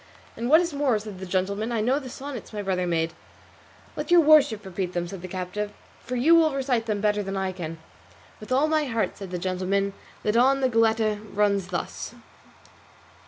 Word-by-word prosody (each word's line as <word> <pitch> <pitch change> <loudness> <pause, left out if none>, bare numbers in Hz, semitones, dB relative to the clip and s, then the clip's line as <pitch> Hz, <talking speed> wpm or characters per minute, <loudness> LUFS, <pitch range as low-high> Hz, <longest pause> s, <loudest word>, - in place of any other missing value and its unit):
"And 235 +2 -3
what 315 +4 +7
is 340 -3 -2
more," 280 -5 +2
said 210 -3 -8
the 190 - -6
gentleman, 200 +5 -1
"I 230 - 0
know 250 +6 +2
the 265 -3 -8
sonnets 270 -1 -7
my 210 -2 -4
brother 185 -2 -1
made." 165 -1 0
"Then - - -25 0.8
let - - -4
your 350 -1 +7
worship 285 -9 +5
repeat 185 -1 -4
them," 175 0 -2
said 190 0 -8
the 185 - -6
captive, 190 +3 -4 0.3
"for 250 - -5
you 275 +7 +4
will 320 -4 +5
recite 255 -4 0
them 210 -2 -1
better 210 0 +2
than 195 0 -4
I 190 -1 -1
can." 165 -3 -6 0.6
"With 215 - -11
all 270 +4 +3
my 310 -1 +1
heart," 230 -4 -1
said 195 -2 -8
the 180 - -3
gentleman; 190 +2 -1 0.3
"that 210 - 0
on 270 +3 +4
the 260 - +3
Goletta 225 -2 +2 0.2
runs 200 -2 +2
thus." - - -5
215 Hz, 205 wpm, -25 LUFS, 190-260 Hz, 0.8 s, what